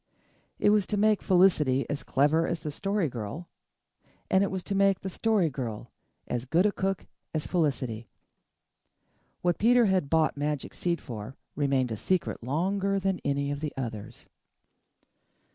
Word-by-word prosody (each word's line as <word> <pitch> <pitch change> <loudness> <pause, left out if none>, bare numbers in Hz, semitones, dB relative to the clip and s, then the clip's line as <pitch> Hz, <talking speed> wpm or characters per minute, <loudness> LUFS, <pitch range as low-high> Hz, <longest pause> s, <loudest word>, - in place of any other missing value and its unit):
It 205 - +3
was 210 -2 +3
to 210 - -1
make 215 0 +3
Felicity 155 -8 +3
as 145 - -3
clever 150 +4 +2
as 170 - -2
the 150 - -4
Story 195 +3 -1
Girl 125 - -6 0.8
and 190 +1 +5
it 200 - 0
was 190 -1 -4
to 200 - -3
make 195 -1 +3
the 190 - -5
Story 215 -3 +2
Girl 120 -5 -5 0.4
as 120 0 -3
good 165 +8 +2
a 210 - +4
cook 195 -1 -2 0.3
as 155 - -1
Felicity. 130 - -1 1.4
What 175 -1 +1
Peter 240 +2 +5
had 185 -7 +1
bought 160 0 +2
magic 145 0 -3
seed 170 -2 -1
for 110 +1 -7 0.2
remained 135 -4 +1
a 110 - -3
secret 185 - -1
longer 190 - 0
than 195 -1 -1
any 140 0 0
of 145 - -3
the 150 -1 -4
others. 115 -5 -6
160 Hz, 160 wpm, -28 LUFS, 135-195 Hz, 1.4 s, and